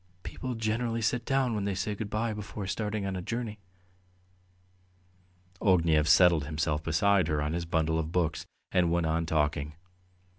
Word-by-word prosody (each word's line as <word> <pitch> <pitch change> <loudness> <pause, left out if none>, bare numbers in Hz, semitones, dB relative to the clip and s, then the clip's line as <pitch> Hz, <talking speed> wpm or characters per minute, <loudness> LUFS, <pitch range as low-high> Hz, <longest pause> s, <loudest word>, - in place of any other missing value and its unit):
"People 130 -2 -5
generally 115 +1 -1
sit 120 +2 0
down 135 -3 +1
when 105 -2 -2
they 100 -1 -1
say 105 +2 -2
good 105 0 -5
bye 110 +2 -1
before 105 -1 -6
starting 105 +1 -2
on 95 -1 -2
a 90 - -3
journey." 115 +1 -4 2.0
Ognev 85 -6 +3
settled 85 -4 +5
himself 75 0 -1
beside 90 +3 +2
her 75 -3 0
on 75 +1 -1
his 85 0 -2
bundle 80 -1 0
of 80 0 -3
books 80 -1 -1 0.2
and 90 -3 +2
went 85 -1 +1
on 80 +1 0
talking. 75 -1 0
90 Hz, 160 wpm, -29 LUFS, 80-105 Hz, 2.0 s, settled